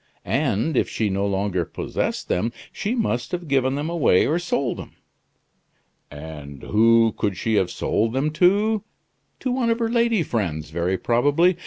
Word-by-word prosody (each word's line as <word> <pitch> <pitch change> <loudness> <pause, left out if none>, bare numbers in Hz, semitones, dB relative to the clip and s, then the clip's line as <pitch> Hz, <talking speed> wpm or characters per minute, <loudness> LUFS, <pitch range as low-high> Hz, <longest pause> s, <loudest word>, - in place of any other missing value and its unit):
And 125 +10 0
if - - +2
she 105 -3 -1
no 100 +1 0
longer 95 -2 0
possessed - - -3
them 110 +6 0 0.2
she 215 +5 -2
must 210 - -1
have 175 -2 -4
given 135 -1 +1
them 145 +2 -2
away 160 - +3
or 160 +4 +1
sold 140 -8 -1
them. - - -10 1.1
And 75 -2 -9
who 115 +1 +4
could 100 -4 -1
she 110 +3 -1
have 95 -3 +2
sold 110 +2 0
them 140 +4 0
to? 200 +6 +3 0.6
To 255 - -1
one 250 -2 0
of 230 - +2
her 230 -1 -1
lady 230 -5 +2
friends, 85 - -3
very 85 +3 0
probably. 145 - +3
120 Hz, 165 wpm, -23 LUFS, -, 1.1 s, who